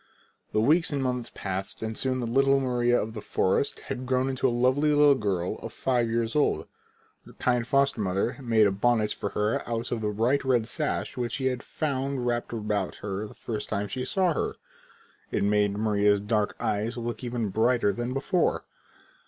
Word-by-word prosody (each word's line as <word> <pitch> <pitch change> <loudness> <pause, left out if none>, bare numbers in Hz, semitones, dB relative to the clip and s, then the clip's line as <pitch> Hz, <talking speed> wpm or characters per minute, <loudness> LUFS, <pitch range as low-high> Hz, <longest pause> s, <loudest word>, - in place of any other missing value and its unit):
The 110 - +1
weeks 155 +10 +3
and 140 -2 -1
months 125 -2 -2
passed 95 +2 -4
and 110 0 -3
soon 130 +1 -1
the - - -2
little 135 +3 +3
Maria 120 -2 +2
of 110 +1 -3
the 110 - -6
forest 95 +9 0
had 130 -1 -5
grown 130 +1 +1
into 130 0 +1
a - - +3
lovely 130 +5 +2
little 145 -1 +6
girl 100 -6 -1
five 120 +1 0
years 115 +1 -1
old. 150 - +2 0.6
Her - - -13
kind 125 -2 0
foster 135 -3 +2
mother 100 +5 0
made 115 -4 +4
a 100 - +3
bonnet 110 +2 +2
for 100 - -4
her 105 +2 +1
out 115 0 -2
of 115 - -1
the 105 - 0
bright 115 +7 +1
red 125 -4 +2
sash 150 +1 -3
which 120 -2 -2
she 135 - -2
had 125 -1 0
found 135 -4 -2
wrapped 120 -1 -1
about 105 -4 -2
her 100 +1 -3
the - - -14
first 105 -2 -5
time 100 +1 -1
she 125 +5 -4
saw 180 +5 +1
her. - - -2 0.7
It - - 0
made 105 0 +2
Maria's 105 -1 +3
dark 105 0 0
eyes 110 +4 -1
look 120 +1 -4
even 120 -3 -2
brighter 110 +1 +2
than 120 +4 -3
before. 145 +6 0
120 Hz, 190 wpm, -27 LUFS, 105-130 Hz, 0.7 s, little